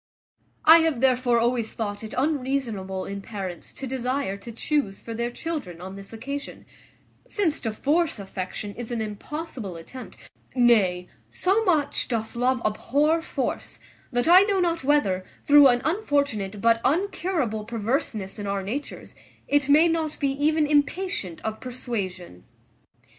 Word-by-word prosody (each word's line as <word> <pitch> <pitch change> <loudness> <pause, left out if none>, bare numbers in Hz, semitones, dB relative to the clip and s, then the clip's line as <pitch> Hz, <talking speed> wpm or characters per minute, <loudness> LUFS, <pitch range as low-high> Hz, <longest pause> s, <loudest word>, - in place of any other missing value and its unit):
"I 325 +2 +10
have 320 -6 +1
therefore 250 -2 +3
always 235 -1 0
thought 205 -1 -4
it 220 - -7
unreasonable 255 -9 -1
in 200 0 -5
parents 195 -4 -6
to 270 - -6
desire 255 -4 -2
to 200 +4 -9
chuse 230 -3 -1
for 230 - -7
their 235 +1 -2
children 245 - -5
on 190 +2 -8
this 195 0 -10
occasion; 275 +5 -6 0.6
since 345 -7 0
to 225 - -2
force 300 +7 +1
affection 195 +1 -5
is 240 0 -7
an 240 -2 -2
impossible 220 - -5
attempt; 245 +10 -10 0.4
nay, 200 -8 +3 0.2
so 395 +5 +1
much 310 -6 +1
doth 225 -2 -3
love 250 +1 +1
abhor 290 +9 +2
force, - - -4 0.3
that 245 +2 0
I 360 +2 +9
know 400 -1 +2
not 340 -4 0
whether, 260 -10 +2 0.2
through 290 -1 +8
an 245 0 +3
unfortunate 280 - 0
but 230 0 +4
uncurable 330 - 0
perverseness 225 -3 -2
in 205 - -4
our 200 -1 -1
natures, 255 +10 -5 0.3
it 285 -1 +2
may 310 +4 +7
not 325 -2 -1
be 280 - +1
even 300 +3 +2
impatient 290 - 0
of 220 0 -4
persuasion. 190 - -5
245 Hz, 145 wpm, -25 LUFS, 210-295 Hz, 0.6 s, I